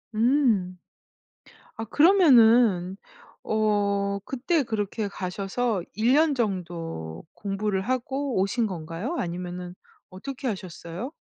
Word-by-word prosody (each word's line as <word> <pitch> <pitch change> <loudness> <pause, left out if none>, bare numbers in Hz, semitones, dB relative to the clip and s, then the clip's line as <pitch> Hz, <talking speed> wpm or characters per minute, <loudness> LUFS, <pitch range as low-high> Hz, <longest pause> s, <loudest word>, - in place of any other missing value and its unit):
음. 220 -7 +2 1.0
아 225 - -4
그러면은 235 - +5 0.5
어 200 -2 0
그때 280 +4 0
그렇게 215 -1 -2
가셔서 195 +3 -2
1 225 +4 +1
년 305 0 +4
정도 170 - -4
공부를 200 -1 -2
하고 255 +2 -2
오신 220 +4 +1
건가요? 175 - -5
아니면은 180 0 -5 0.4
어떻게 265 +8 -7
하셨어요? 185 - -6
205 Hz, 210 characters per minute, -26 LUFS, 185-245 Hz, 1.0 s, 그러면은